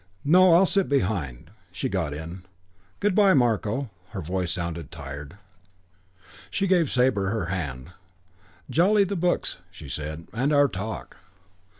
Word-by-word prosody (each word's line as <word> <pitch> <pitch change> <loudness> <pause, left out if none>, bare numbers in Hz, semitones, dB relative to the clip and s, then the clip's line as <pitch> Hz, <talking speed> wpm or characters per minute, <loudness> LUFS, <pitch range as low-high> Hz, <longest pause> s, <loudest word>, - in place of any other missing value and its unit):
"No, 180 +3 +6
I'll 185 +3 +6
sit 195 +1 +1
behind." 90 - -1 0.2
She 90 - -2
got 90 -6 -1
in. 85 +5 -7 0.6
"Good 205 -1 +1
by, 200 -1 +5
Marko." 120 0 +1 0.2
Her 100 - -5
voice 90 +1 -2
sounded 85 -3 -4
tired. 70 +4 -8 1.1
She 195 - -1
gave 175 -6 +3
Sabre 125 -7 +2
her 110 -4 -1
hand. 70 -4 -5 0.8
"Jolly, 200 +5 +4
the 200 +1 -2
books," 175 - 0
she 85 -5 -12
said. 75 +4 -5
"And 130 +6 0
our 145 -1 +5
talk." 110 -1 -6
100 Hz, 135 wpm, -25 LUFS, -, 1.1 s, No